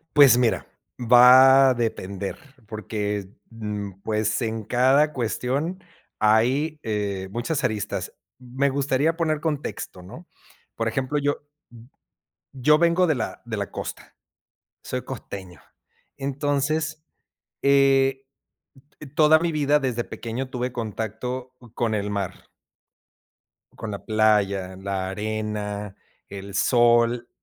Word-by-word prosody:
Pues 140 -4 +8
mira, 120 -2 +1 0.3
va 130 +3 +7
a - - +2
depender 100 -5 -3 0.3
porque, 105 -2 -4 0.2
mm, 105 -4 -6
pues, 110 +2 -1
en 110 -1 -3
cada 130 +7 +3
cuestión 135 - -2 0.4
hay 130 +9 +2
eh, 100 -4 -3
muchas 125 +8 -2
aristas. 110 -6 -2 0.3
Me 130 +2 -1
gustaría 140 +3 +1
poner 155 -3 0
contexto, 150 - -4
¿no? 130 - -12 0.5
Por 115 0 -1
ejemplo, 130 +5 -2
yo 145 0 -1 1.1
yo 145 +3 +4
vengo 170 +2 +3
de 160 - +2
la 115 -4 -5
de 115 -2 -4
la 100 -1 -4
costa, - - -7 0.7
soy - - -4
costeño, 95 -3 -8 0.5
entonces, 145 +3 -1 0.6
eh, 135 -1 +3 0.9
toda 155 0 +6
mi 170 0 0
vida 150 -1 +2
desde 120 -3 -2
pequeño 125 +3 -5
tuve 125 0 -3
contacto 115 +3 -5 0.2
con 115 -2 0
el 105 -1 -2
mar. 100 -3 -4 1.3
Con 110 - -6
la 100 - -7
playa, 100 -4 +1
la 95 -1 -3
arena, 105 -1 -4 0.3
el 100 0 -8
sol. 120 +2 +3
120 Hz, 110 wpm, -24 LUFS, 105-140 Hz, 1.3 s, Pues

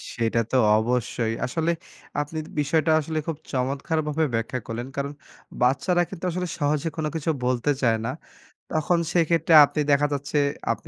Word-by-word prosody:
সেটা 115 0 +1
তো - - 0 0.2
অবশ্যই। 115 0 0
আসলে 160 +6 0 0.5
আপনি 150 +2 -6 0.2
বিষয়টা 155 +2 +2
আসলে 155 +1 -2
খুব 165 -3 -2
চমৎকারভাবে 150 +4 -1
ব্যাখ্যা 115 +3 -1
করলেন। 120 +2 -4
কারণ 140 0 -2 0.5
বাচ্চারা 140 +8 +3
কিন্তু - - -9
আসলে 180 +1 -2
সহজে 150 +2 0
কোনো 155 -1 -1
কিছু 160 0 -2 0.2
বলতে 125 +3 +1
চায় 115 -4 +3
না। 125 - -1 0.6
তখন 160 +2 +2
সেক্ষেত্রে 165 -1 +2
আপনি 150 - -2
দেখা 145 +1 +4
যাচ্ছে, 145 +1 -2 0.3
আপনি - - -5
145 Hz, 150 wpm, -25 LUFS, 125-160 Hz, 0.6 s, দেখা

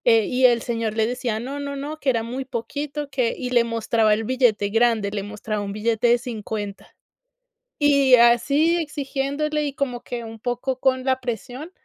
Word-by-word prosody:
Eh, 225 -3 +5
y 255 0 +2
el 235 -2 +1
señor 230 -2 -2
le 220 -1 +2
decía: 240 -2 -2
"No, 270 +5 -5
no, 280 0 -4
no", 295 +3 -6
que 280 - 0
era 230 -3 +1
muy 250 +4 -4
poquito, 285 +4 -5
que 255 -4 0
y 250 - -4
le 240 -2 +4
mostraba 225 -1 +1
el 220 - -3
billete 225 -4 +2
grande. 225 -2 +2
Le 205 -1 -3
mostraba 210 +1 -4
un 200 0 -5
billete 225 +2 0
de 240 +1 +5
$50, 215 -4 -6 0.8
y 280 -3 +5
así, 275 +7 +4
exigiéndole. 295 0 -2
Y 285 - -3
como 260 -4 -3
que, 240 -1 -6
un 225 0 -9
poco 245 +2 -3
con 260 -1 +1
la 260 -1 +1
presión, 250 - -5
245 Hz, 185 wpm, -23 LUFS, 225-275 Hz, 0.8 s, Eh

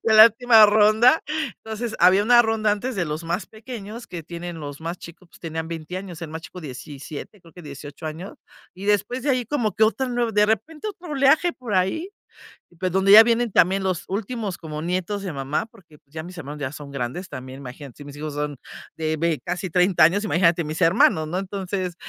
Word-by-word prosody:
de 220 - +3
la 215 +1 +11
última 230 -1 +6
ronda. 215 +7 +5 0.4
Entonces 220 +1 -4
había 190 +2 +5
una 240 +2 +6
ronda 220 -2 +1
antes 240 +5 -3
de 180 - 0
los 155 +1 -4
más 170 +2 -2
pequeños 225 0 -9
que 170 -2 -7
tienen 170 +1 -7
los 145 0 -7
más 170 +2 -5
chicos, 170 +2 -13
pues - - -20
tenían 160 -1 -5
20 165 +1 -6
años, 185 -3 -7
el 165 - -5
más 160 +1 -7
chico 180 - -10
17, 145 - -9
creo 165 -2 -18
que 175 - -12
18 145 +1 -10
años. 160 +5 -7 0.4
Y 190 - -9
después 210 +5 0
de 285 - +1
ahí 255 -2 +1
como 230 -5 -1
que 220 - +4
otra 255 +4 0
nuev 240 -2 -1
de 210 0 +4
repente 300 - -2
otro 360 -5 -8
oleaje 290 +5 +3
por 245 -8 -5
ahí, 190 - 0 0.7
pues 185 0 -2
donde 190 +1 +4
ya 215 +2 +12
vienen 235 0 +1
también 190 +3 +3
los 185 -3 -2
últimos 205 0 -4
como 155 -2 -6
nietos 185 +4 -2
de 190 -4 -4
mamá, 140 +5 -2
porque 185 -9 -20
pues 140 - -38
ya 160 - -4
mis 180 +2 -10
hermanos 150 0 -7
ya 130 -2 -2
son 145 -1 -9
grandes 140 +8 -4
también, 130 +1 -8
imagínate, 135 0 -10
si 145 - -10
mis 145 0 -10
hijos 150 0 -5
son 145 -1 -3 0.4
de 160 0 -1
vei 165 -1 0
casi 180 +1 -4
30 180 0 +4
años, 195 +6 +3
imagínate 170 -3 +2
mis 155 +3 -5
hermanos, 165 -2 +4
¿no? 175 +4 -2
Entonces, 190 -1 -4
185 Hz, 215 wpm, -23 LUFS, 160-220 Hz, 0.7 s, ya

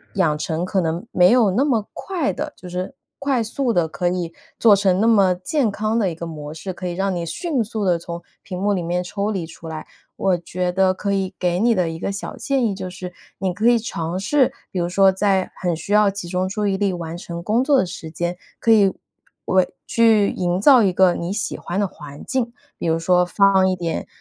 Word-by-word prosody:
养 165 -6 +2
成 160 +2 -2
可 185 +1 0
能 170 +6 -2
没 180 +3 +5
有 240 -4 +5
那 245 +9 +2
么 230 -7 0
快 340 - -2
地 - - -5
就 180 - -11
是 180 +7 -4 0.2
快 275 -3 0
速 235 +2 -1
地 175 -4 +2
可 160 +3 -2
以 175 -2 -3 0.3
做 220 -3 +7
成 190 -1 +2
那 225 - +3
么 200 -5 +5
健 220 - 0
康 215 +2 -1
的 200 -6 +1
一 - - -7
个 170 +1 -6
模 150 -2 -7
式， 160 +4 -6
可 180 +1 -6
以 175 - -3
让 195 +1 -1
你 170 -1 -3
迅 270 - -1
速 215 0 -4
地 180 -2 +3
从 170 0 -7 0.2
屏 180 - -6
幕 205 +1 +2
里 185 -3 0
面 175 +2 -1
抽 200 +4 -2
离 180 -5 -3
出 165 0 -11
来。 160 -1 -6 0.3
我 190 -2 +2
觉 180 +1 -3
得 190 +1 +3
可 200 +2 -3
以 195 -1 -1
给 180 -1 0
你 235 +3 +4
的 180 -3 +1
一 165 - -5
个 - - -2
小 200 +2 -6
建 275 -2 0
议 205 - -1
就 190 -1 -5
是， 180 0 -7 0.3
你 190 -1 0
可 210 +6 0
以 240 0 +6
尝 170 -6 -4
试， 260 +6 +2 0.2
比 185 - -2
如 175 - 0
说 190 +2 +4
在 190 -1 +1
很 175 -2 0
需 165 - -8
要 210 -1 +5
集 195 -2 -6
中 185 +1 0
注 210 +2 -2
意 195 -1 0
力 200 -1 +1
完 170 -1 -5
成 170 -1 -7
工 215 +6 +2
作 285 0 +4
的 - - +2
时 170 -2 -8
间， 175 +2 -3 0.2
可 230 - +2
以 200 -4 +5 0.5
为 185 -1 +2 0.2
去 220 -3 +4
营 180 0 -1
造 255 +1 +7
一 195 - +3
个 185 -1 +4
你 170 +3 -3
喜 210 - -3
欢 175 - -5
的 205 - +2
环 145 -4 -11
境， 245 -3 -1 0.3
比 - - -2
如 165 0 +2
说 180 +2 +3
放 190 0 +4
一 185 - 0
点， 170 -2 -3
190 Hz, 255 characters per minute, -21 LUFS, 175-210 Hz, 0.5 s, 做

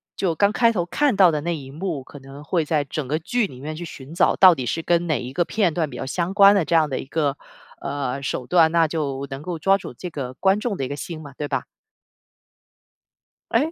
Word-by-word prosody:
就 175 -4 -1
刚 200 +4 +3
开 230 +1 +3
头 175 -6 -1
看 270 +6 +1
到 185 -3 +6
的 150 - -2
那 170 +2 -2
一 135 -2 -10
幕， 160 -3 -4
可 145 - -12
能 135 +2 -12
会 165 +2 0
在 150 -1 +1
整 140 0 -5
个 150 +4 0
剧 210 +7 -1
里 130 -7 -12
面 155 +3 -6
去 170 - -6
寻 145 -3 -10
找， 170 - +3
到 185 -2 +8
底 130 - -4
是 165 +7 -2
跟 175 +1 +1
哪 155 - +1
一 125 +1 -7
个 175 - +2
片 190 -3 0
段 160 -3 -1
比 125 - -8
较 - - -4
相 170 +7 -2
关 200 0 +8
的， 200 - +2
这 165 - 0
样 160 -2 +4
的 135 - -2
一 - - -6
个， 145 -2 0 0.5
呃， 140 -1 -3
手 130 -2 -3
段， 165 0 +4
那 165 -1 +3
就 140 -4 -3
能 135 - -5
够 170 +2 -4
抓 195 +5 +3
住 - - -8
这 180 - -7
个 130 -4 -5
观 195 +6 +2
众 215 -4 -2
的 135 - -2
一 - - -4
个 140 - -4
心 160 +2 -6
嘛， 145 -3 -11
对 150 - -4
吧？ - - -2 1.9
哎？ 315 +3 +2
160 Hz, 270 characters per minute, -22 LUFS, 140-180 Hz, 1.9 s, 到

